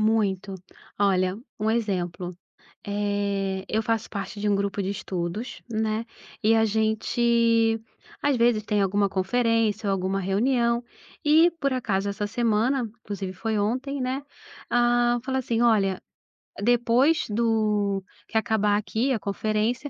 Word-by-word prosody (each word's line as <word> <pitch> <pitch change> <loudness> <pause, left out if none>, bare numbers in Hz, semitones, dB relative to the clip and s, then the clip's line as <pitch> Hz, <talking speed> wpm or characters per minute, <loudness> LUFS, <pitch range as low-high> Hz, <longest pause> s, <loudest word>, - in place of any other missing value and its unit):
Muito. 205 -3 +1 0.4
Olha, 185 -2 +2 0.2
um 215 0 0
exemplo, 180 -5 -2 0.5
eh, 200 -2 -1
eu 220 - +1
faço 225 0 -1
parte 205 0 -5
de 210 - 0
um 200 - +3
grupo 200 0 -1
de 190 - -2
estudos, 195 +4 -4
né, 220 0 -1 0.4
e 220 +2 +4
a 225 0 +4
gente, 225 +1 +2 0.4
às 285 -2 +2
vezes, 235 -3 +2
tem 210 -2 +1
alguma 200 +1 +2
conferência 220 +2 +1
ou 195 - +2
alguma 190 +1 -1
reunião. 235 +5 +1 0.4
E, 320 +3 +5
por 275 -1 +1
acaso, 205 -6 -1
essa 200 +1 -2
semana, 230 +2 +1
inclusive 195 -2 -5
foi 220 +4 -2
ontem, 255 +7 -1
né, 260 +2 -1 0.5
hã, 240 0 +3
falou 265 0 -1
assim: 235 -2 0
"Olha, 200 -5 +2 0.6
depois 245 +7 +3
do 210 -3 +1 0.2
que 220 - -1
acabar 210 -2 +2
aqui 225 +5 -1
a 225 - -1
conferência, 215 +6 -1
220 Hz, 135 wpm, -25 LUFS, 200-235 Hz, 0.6 s, E